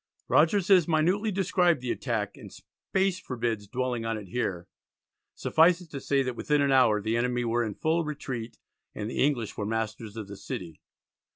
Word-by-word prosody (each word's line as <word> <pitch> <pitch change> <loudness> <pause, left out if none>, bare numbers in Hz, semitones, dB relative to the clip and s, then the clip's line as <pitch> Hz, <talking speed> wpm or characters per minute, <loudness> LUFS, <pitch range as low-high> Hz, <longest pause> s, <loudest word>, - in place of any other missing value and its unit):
Rogers 180 +5 +3
has 185 -5 +6
minutely 180 +7 +2
described 180 -4 +2
the 125 -1 -2
attack, 110 -6 -2
and - - -12
space 190 -1 -2
forbids 115 - -3
dwelling 125 0 -2
on 115 -1 -2
it 100 -4 -9
here; 90 -6 -2 0.7
suffice 170 +2 +4
it 175 -4 -14
to 140 - -6
say 140 0 +1
that 125 -2 -3
within 150 +4 +1
an 140 -1 +2
hour 125 -5 +5
the 110 +2 0
enemy 120 +1 0
were 120 +1 +1
in 105 -3 -4
full 165 +2 +1
retreat 130 -6 -5 0.4
and 105 +2 -4
the - - +1
English 130 -7 0
were 105 - -2
masters 110 0 -3
of 110 -3 -5
the 100 0 -9
city. 85 -4 -7
125 Hz, 185 wpm, -28 LUFS, 110-160 Hz, 0.7 s, has